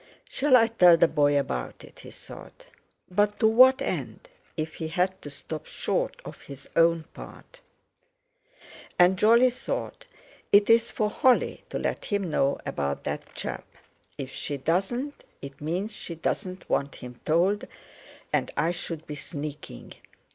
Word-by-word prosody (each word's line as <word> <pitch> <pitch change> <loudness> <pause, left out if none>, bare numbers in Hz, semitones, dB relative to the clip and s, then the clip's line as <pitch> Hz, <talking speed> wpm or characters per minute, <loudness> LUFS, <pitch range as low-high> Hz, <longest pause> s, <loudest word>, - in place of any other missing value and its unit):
"Shall 295 - +3
I 230 - +5
tell 180 -7 +6
the 165 - +5
boy 145 -2 +3
about 65 - -4
it?" - - -15
he - - -11
thought. - - -12 0.5
But 205 +2 +1
to 220 - +5
what 260 +4 +6
end—if 275 - -6
he 160 - -5
had 185 +3 -1
to 145 - -8
stop 155 +2 -7
short - - -2
of - - -10
his 140 0 -11
own 165 0 +4
part? - - -13 1.4
And 180 +1 +5
Jolly 235 +6 +5
thought: 250 - -5 0.4
"It's 230 +3 +5
for 215 - -1
Holly 260 0 +2
to - - -3
let - - -3
him 200 -5 -1
know 140 -2 +1
about 70 0 -3
that - - -5
chap. - - -5 0.5
If 135 -1 -6
she 145 - -4
doesn't, 195 - -2 0.2
it 140 +1 -10
means 180 +8 -2
she 170 -5 -6
doesn't 185 +3 -4
want 140 0 -1
him 125 -1 -10
told, 190 +9 +2 0.7
and - - +1
I 170 - +2
should 165 -2 -5
be 150 - -7
sneaking. 145 - -7
180 Hz, 145 wpm, -26 LUFS, 150-220 Hz, 1.4 s, tell